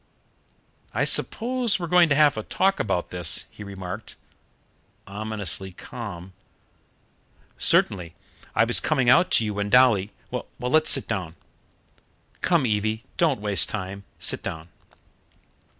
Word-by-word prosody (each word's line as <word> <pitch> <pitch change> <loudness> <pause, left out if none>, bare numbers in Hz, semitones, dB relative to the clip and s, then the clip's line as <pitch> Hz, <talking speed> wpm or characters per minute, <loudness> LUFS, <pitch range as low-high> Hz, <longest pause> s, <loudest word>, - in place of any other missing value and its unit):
"I - - +1
suppose 245 -1 0
we're 175 - -3
going 175 0 +4
to 145 - +3
have 150 -2 +4
a 110 - -3
talk 195 - 0
about 95 -4 -2
this?" 90 -3 +1
he 105 - -10
remarked, 95 +1 -8 0.9
ominously 100 -2 -5
calm. 95 -3 -9 1.3
"Certainly. 85 -4 +2 0.4
I - - +5
was - - +3
coming 125 -2 +2
out 175 - +5
to 115 - +3
you 105 - -2
when 100 0 -3
Dolly 115 -5 +4
" - - -34
"Well, - - -4
let's 155 +6 +2
sit 135 - +4
down." 85 -4 -4 1.1
"Come, 170 -6 +2
Evie, 110 0 -1
don't 155 -8 +2
waste 100 -5 +3
time, 100 -1 -5
sit - - +1
down." 80 +1 -6
110 Hz, 135 wpm, -24 LUFS, 95-135 Hz, 1.3 s, I